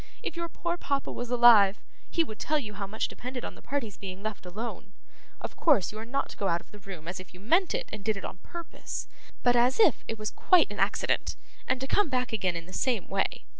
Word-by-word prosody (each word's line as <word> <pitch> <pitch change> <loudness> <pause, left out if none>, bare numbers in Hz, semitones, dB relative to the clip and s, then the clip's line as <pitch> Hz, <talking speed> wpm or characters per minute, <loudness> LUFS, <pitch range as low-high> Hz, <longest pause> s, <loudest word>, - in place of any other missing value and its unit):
If - - -3
your 340 0 -3
poor 345 +1 -2
papa 280 -4 -1
was 245 -1 -4
alive, 230 -5 +7 0.3
he 335 - +2
would 215 -9 -8
tell 305 - +1
you 220 -8 -4
how 200 -1 -4
much 215 +3 -1
depended 250 0 -6
on - - -5
the - - -15
parties 240 -7 -3
being 190 0 -7
left 215 -4 -4
alone. 205 +1 -6 0.5
Of - - -6
course, 280 - +4
you 215 - -7
are 220 - -6
not 275 +4 -1
to - - -10
go 200 - 0
out 170 -1 +2
of - - -20
the 210 - -11
room 185 -5 -9
as 180 +1 -4
if 185 -1 -12
you - - -12
meant 335 - +3
it - - -2
and 205 - -5
did 220 -1 +1
it - - -5
on - - -6
purpose, 340 - -6 0.4
but 245 0 +5
as 245 - +4
if 440 - +5
it 225 - -3
was 215 0 -3
quite 360 - +4
an 205 - -6
accident, 195 +2 +1 0.3
and 260 0 +1
to - - -1
come 410 +3 +3
back 250 -3 0
again 185 -5 +1
in 170 -1 -5
the 185 - -13
same 235 -4 0
way. 195 0 -1
225 Hz, 250 wpm, -29 LUFS, 195-270 Hz, 0.5 s, alive